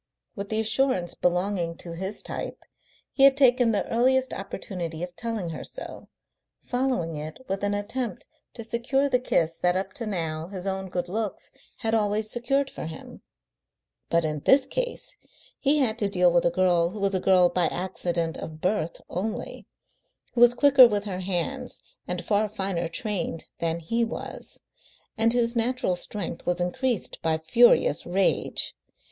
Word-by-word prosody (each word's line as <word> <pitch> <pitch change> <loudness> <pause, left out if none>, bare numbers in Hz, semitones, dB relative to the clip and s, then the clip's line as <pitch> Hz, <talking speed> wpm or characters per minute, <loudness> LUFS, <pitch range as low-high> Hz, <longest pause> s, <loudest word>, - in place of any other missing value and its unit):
With 200 -2 -5
the 220 - 0
assurance 220 -5 +1
belonging 180 -1 0
to 170 - -9
his 190 +4 -5
type, - - -6 0.5
he - - -3
had 275 0 +7
taken 250 -3 +5
the 205 - 0
earliest 260 +3 +2
opportunity 180 -4 -5
of 180 0 -6
telling 220 -2 -3
her 160 - -6
so, - - -8 0.6
following 245 -11 -1
it 155 +1 -6
with 195 +1 -3
an 205 0 +1
attempt 220 +1 -3 0.3
to 230 - -6
secure 240 +5 0
the 250 -3 +2
kiss 165 -9 0
that 180 0 +2
up 190 0 -2
to 230 - -5
now 165 -5 -3
his 185 -1 -7
own 190 -1 -3
good 180 -1 -2
looks 210 +2 -4 0.3
had 225 0 0
always 215 0 +1
secured 275 +3 0
for - - -6
him. 160 - -10 0.9
But 170 -1 +2
in 150 -1 -2
this 265 - +5
case - - -3 0.4
he 290 +2 +3
had 235 -5 +1
to 205 - +1
deal 180 -2 +4
with 175 0 +3
a - - +5
girl 175 -1 +2
who 210 +4 -8
was 200 0 +1
a 185 - +2
girl 180 -1 +5
by 175 0 +1
accident 175 -2 -2
of 155 -1 -7
birth 175 -2 -1
only, 210 +5 -4 0.7
who 240 - 0
was 240 0 +7
quicker 270 -1 +8
with 205 -3 -1
her 190 -3 -4
hands 195 +8 -2 0.3
and 180 -1 -3
far 210 0 +2
finer 190 -4 -2
trained 180 -4 -3
than 165 0 -1
he 230 +8 0
was, 225 - -6 0.6
and 225 +1 +3
whose 235 0 +1
natural 235 -4 +1
strength 180 -1 -5
was 180 0 +1
increased 220 +6 0
by 160 -1 +1
furious 160 -1 +4
rage. 190 +2 0
195 Hz, 165 wpm, -26 LUFS, 175-235 Hz, 0.9 s, quicker